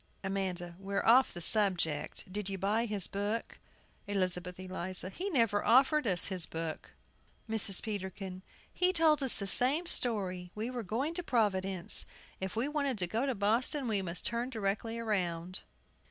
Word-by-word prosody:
AMANDA. 185 -3 -4
We're 200 +1 -3
off 250 +3 +5
the 175 - -8
subject. 180 -6 +3
Did 205 -1 -3
you 195 - -4
buy 210 +5 -1
his 205 -4 +4
book? 205 +3 -4 0.5
ELIZABETH 185 -2 -2
ELIZA. 185 0 -3
He 380 - -5
never 230 - +1
offered 270 +3 +3
us 180 -4 +5
his 185 -3 -1
book. 165 -1 -7 0.5
MRS. 215 -4 +3
PETERKIN. 190 -3 -6 0.3
He 365 0 +1
told 315 -4 +3
us 265 -3 +6
the 200 - -1
same 265 - +3
story, 190 - -1
we 220 +4 -4
were 250 -1 -5
going 235 - -3
to 355 - -1
Providence; 195 - +2 0.3
if 190 +1 -5
we 235 +5 -1
wanted 285 -4 -2
to 185 - -1
go 225 +9 -2
to 265 - -1
Boston, 235 +7 +1
we 210 -3 0
must 175 -1 -4
turn 235 +2 -2
directly 225 0 -3
round. 185 -5 -3
205 Hz, 160 wpm, -31 LUFS, 185-235 Hz, 0.5 s, us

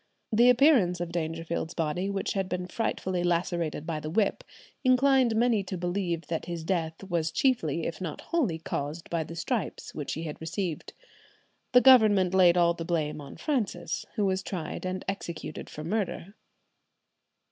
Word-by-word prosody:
The 240 +3 +6
appearance 245 - +5
of 175 -1 -3
Dangerfield's 165 0 -3
body, 170 +4 -1
which 200 -1 -2
had 195 -2 -1
been 180 0 -2
frightfully 185 -3 -2
lacerated 170 -3 -1
by 160 -2 -2
the 155 - -5
whip, 200 +5 +1 0.4
inclined 255 -2 +4
many 230 -2 +3
to 185 -1 -4
believe 175 -2 -2
that 165 +2 -4
his 170 -2 -4
death 165 -1 -2
was 170 -4 -1
chiefly 170 - +1
if 170 - -4
not 170 -4 -5
wholly 275 - 0
caused 155 0 -5
by 165 -1 0
the 165 +2 -9
stripes 185 - -3
which 145 -2 -4
he 160 - -4
had 155 -1 -6
received." 165 0 -4 0.8
The 250 - +8
Government 215 -8 +6
laid 180 -2 +6
all 170 -1 +4
the 165 - -6
blame 155 -3 -1
on 140 - -10
Francis, 265 -10 -2
who 210 -3 +1
was 190 -1 +1
tried 185 -1 -5
and 185 0 -4
executed 170 -5 -5
for 150 - -7
murder. 195 +1 -2
175 Hz, 165 wpm, -28 LUFS, 165-200 Hz, 0.8 s, The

